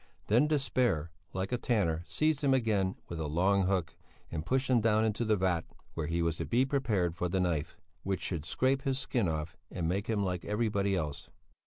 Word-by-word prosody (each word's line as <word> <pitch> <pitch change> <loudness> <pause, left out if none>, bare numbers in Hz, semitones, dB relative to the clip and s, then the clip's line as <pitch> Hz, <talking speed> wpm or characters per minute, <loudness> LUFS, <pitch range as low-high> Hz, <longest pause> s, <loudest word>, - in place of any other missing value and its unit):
Then 120 +8 +5
despair, 125 - +1 0.2
like 95 +1 -3
a 125 - 0
tanner, 85 -11 +1
seized 155 -1 +1
him 135 -1 +4
again 105 -6 +1
with 85 - -5
a 80 - -2
long 95 +5 +2
hook, 90 -4 0 0.4
and 80 -2 -3
pushed 130 - +1
him 125 -3 +4
down 110 0 +3
into 110 +1 0
the 110 -1 +3
vat, 90 -4 +1 0.3
where 80 -2 -3
he 85 +1 0
was 85 -1 0
to - - -3
be 125 +3 +2
prepared 110 - 0
for 90 0 -1
the 95 +2 0
knife, 85 -5 -1 0.2
which 95 0 -2
should 85 -5 -2
scrape 130 - +1
his 135 -1 0
skin 125 -6 0
off 80 0 -3
and 85 - -2
make 95 +3 -1
him 105 -3 +1
like 90 -2 -2
everybody 105 -2 0
else. 75 -5 -4
100 Hz, 205 wpm, -31 LUFS, 85-120 Hz, 0.4 s, Then